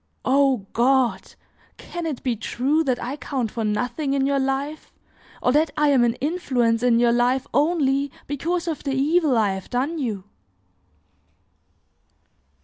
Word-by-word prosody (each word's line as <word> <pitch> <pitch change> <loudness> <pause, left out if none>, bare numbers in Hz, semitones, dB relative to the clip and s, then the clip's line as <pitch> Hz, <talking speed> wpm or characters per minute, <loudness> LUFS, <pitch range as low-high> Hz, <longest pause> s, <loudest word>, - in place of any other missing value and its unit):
O 265 -5 +2
God! 255 +1 +1 0.4
can 345 -1 -6
it 290 -6 -5
be 250 -3 0
true 265 +8 0
that 255 -2 +1
I 260 +4 -4
count 260 -7 -3
for 230 - -3
nothing 250 +7 -1
in 270 -1 +1
your 275 0 +1
life, 270 +3 -3 0.5
or 250 - +3
that 300 +3 +3
I 300 -1 +3
am 265 -4 +4
an 235 0 +1
influence 255 -8 0
in 240 -2 +3
your 240 0 +4
life 250 +2 +1
only 285 -3 +1
because 335 +5 -2
of 320 -3 -3
the 275 -2 -2
evil 295 -1 +2
I 210 -3 +2
have 190 -1 -6
done 275 +7 -1
you!" 215 -8 -3
270 Hz, 150 wpm, -23 LUFS, 240-290 Hz, 0.5 s, am